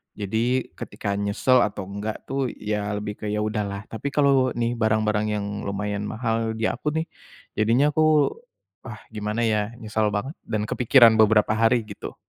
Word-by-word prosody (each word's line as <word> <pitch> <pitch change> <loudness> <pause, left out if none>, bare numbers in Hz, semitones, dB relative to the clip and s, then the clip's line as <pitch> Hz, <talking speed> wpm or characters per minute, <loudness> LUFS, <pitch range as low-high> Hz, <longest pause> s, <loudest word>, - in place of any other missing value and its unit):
Jadi, 115 +5 -1
ketika 100 - -4
nyesel 100 +5 +2
atau 105 -4 -1
enggak 100 +2 -5
tuh, 135 -1 -1
ya 105 -1 -3
lebih 105 0 -5
ke, 105 - -5
"Ya 105 +1 -1
udahlah," 105 -2 -3
tapi 115 +5 -4
kalau 140 -3 +4
nih 120 0 0
barang-barang 110 -2 +1
yang 105 -1 -3 0.2
lumayan 105 +1 -3
mahal 115 0 -2
di 110 - -5
aku - - -8
nih, 160 - +1 0.5
jadinya 120 +8 +3
aku, 155 -1 +3 0.6
"Ah, - - -8
gimana, 105 +1 -2
ya?" 110 0 0
Nyesel 110 -1 -1
banget 125 +8 -2 0.2
dan 110 -2 -1
kepikiran 120 -2 +6
beberapa 110 -1 +4
hari 115 +2 +3
gitu. 105 -2 -9
110 Hz, 160 wpm, -24 LUFS, 105-120 Hz, 0.6 s, kepikiran